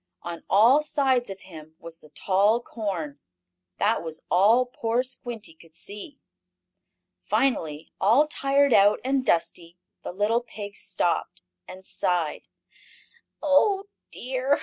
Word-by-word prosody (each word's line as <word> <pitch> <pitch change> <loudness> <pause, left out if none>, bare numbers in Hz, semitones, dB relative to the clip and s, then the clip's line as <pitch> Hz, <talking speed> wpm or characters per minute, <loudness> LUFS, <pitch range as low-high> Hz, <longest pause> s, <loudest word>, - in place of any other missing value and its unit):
On 170 -1 -6
all 230 +9 +6
sides 265 -5 +1
of 195 0 -8
him 160 -3 -13
was 165 0 -11
the 155 - -18
tall 200 +7 +2
corn. 185 -12 -5 0.6
That 220 +3 +1
was 160 -1 -8
all 220 +7 +5
poor 240 0 -1
Squinty 240 -6 -7
could 160 0 -20
see. 205 - -8 1.0
Finally, 160 - -1
all 230 +10 +5
tired 280 -2 +2
out, 205 +1 +5
and 265 0 +1
dusty, 170 -3 -1 0.2
the - - -6
little 210 +5 +1
pig 210 -4 -9
stopped, - - -2 0.2
and 190 +1 -11
sighed: 175 -5 -1 1.0
"Oh 390 +8 +3 0.2
dear! 260 +3 -1
210 Hz, 125 wpm, -25 LUFS, 175-255 Hz, 1.0 s, all